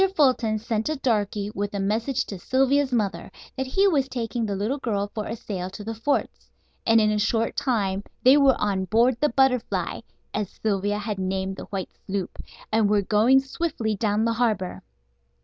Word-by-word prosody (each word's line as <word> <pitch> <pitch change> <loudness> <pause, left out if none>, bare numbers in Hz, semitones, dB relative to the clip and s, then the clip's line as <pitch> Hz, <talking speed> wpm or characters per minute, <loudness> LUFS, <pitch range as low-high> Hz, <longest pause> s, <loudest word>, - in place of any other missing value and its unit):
Fulton 255 -7 +3
sent 220 +2 -2
a 310 - 0
darky 210 -6 -1
with 205 0 -3
a - - -1
message 230 +7 0
to 195 - -7
Sylvia's 270 +5 +2
mother 215 -5 -1 0.2
that 265 0 -3
he 390 +9 +3
was 280 -7 +2
taking 235 -2 -2
the 200 - -2
little 220 +9 -1
girl 205 -5 -2
for 215 -1 -4
a 225 - -3
sail 185 -5 -5
to 200 +2 -9
the 225 +2 -4
forts, 230 +6 -2 0.4
and 225 0 +6
in 215 -1 +3
a 210 - 0
short 225 +1 0
time 200 -6 0 0.2
they 260 +2 +8
were 275 -2 +5
on 195 -2 0
board 230 +5 +3
the 300 - +3
Butterfly, 255 -1 +1 0.3
as 210 -3 -2
Sylvia 205 -1 -1
had 210 -1 -4
named 190 0 -2
the - - -7
white 195 -2 -5 0.2
sloop, 195 -2 -4 0.3
and 215 -2 +3
were 205 -1 +3
going 225 +7 +4
swiftly 270 -6 -2
down 210 +1 +1
the 230 - +1
harbor. 215 -6 -1
220 Hz, 185 wpm, -25 LUFS, 205-255 Hz, 0.4 s, they